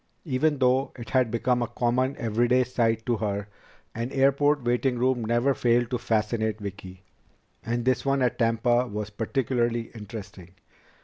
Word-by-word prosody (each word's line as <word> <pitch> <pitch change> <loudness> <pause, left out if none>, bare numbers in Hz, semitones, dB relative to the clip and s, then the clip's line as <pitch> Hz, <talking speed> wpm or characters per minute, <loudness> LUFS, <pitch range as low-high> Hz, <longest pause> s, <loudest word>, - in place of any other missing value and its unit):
Even 150 +1 +1
though 130 +1 +2
it 120 - -9
had 130 -3 +3
become 120 +2 0
a 120 - 0
common, 125 +3 0
everyday 120 +3 +2
sight 115 -2 0
to 120 -2 +1
her, 100 -1 -2 0.5
an 115 +3 -4
airport 140 +1 +2
waiting 125 +1 +1
room 125 -1 +1
never 120 +5 +2
failed 120 -1 +1
to 125 - -1
fascinate 110 -1 -1
Vicki. 95 -2 -8 0.6
And 120 0 -2
this 130 -1 +2
one 135 -1 +1
at 125 - 0
Tampa 120 +1 +2
was 105 -1 -5
particularly 120 +1 -1
interesting. 105 -5 -10
120 Hz, 150 wpm, -26 LUFS, 110-130 Hz, 0.6 s, had